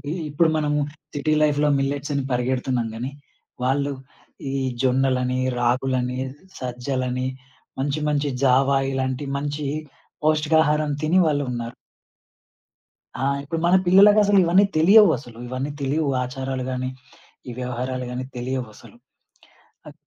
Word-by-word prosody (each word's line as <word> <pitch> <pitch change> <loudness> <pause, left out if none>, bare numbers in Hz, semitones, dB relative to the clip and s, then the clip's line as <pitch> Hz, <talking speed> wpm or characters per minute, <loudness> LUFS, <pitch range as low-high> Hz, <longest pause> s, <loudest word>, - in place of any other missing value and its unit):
ఇవి 145 +3 -4 0.2
ఇప్పుడు, 160 +3 +3
మనము 150 -1 0 0.4
సిటీ 155 +2 +1
లైఫ్‌లో 150 0 +2
మిల్లెట్సని 140 0 -2
పరిగెడుతున్నాం 125 -1 0
గానీ, 125 +4 -4 0.5
వాళ్ళు 140 +2 +1 0.6
ఈ 135 - -2 0.3
జొన్నలని, 130 -1 +1 0.2
రాగులని, 125 +1 0 0.4
సజ్జలని, 125 0 -2 0.5
మంచి 140 +3 -1
మంచి 145 0 0
జావా 135 +1 +4 0.2
ఇలాంటి 130 +1 -2
మంచి 145 +1 -3 0.6
పౌష్టికాహారం 155 0 +2
తిని 160 +4 +2
వాళ్ళున్నారు. 125 -6 -2 1.5
ఆ! - - 0 0.2
ఇప్పుడు 160 +3 -3
మన 180 +2 +5
పిల్లలకసలు 205 +2 +6
ఇవన్నీ 180 +4 +5
తెలియవు 195 +4 +7
అసలు, 120 -5 -13
ఇవన్నీ 130 +3 -3
తెలీవు. 145 +2 0 0.2
ఆచారాలు 130 0 -4
గానీ, 130 0 -2 0.6
ఈ - - -5
వ్యవహారాలు 125 +1 -3
గానీ, 125 +1 -4
తెలియవసలు. 125 -3 -6 0.9
అ - - -11
135 Hz, 110 wpm, -23 LUFS, 125-150 Hz, 1.5 s, తెలియవు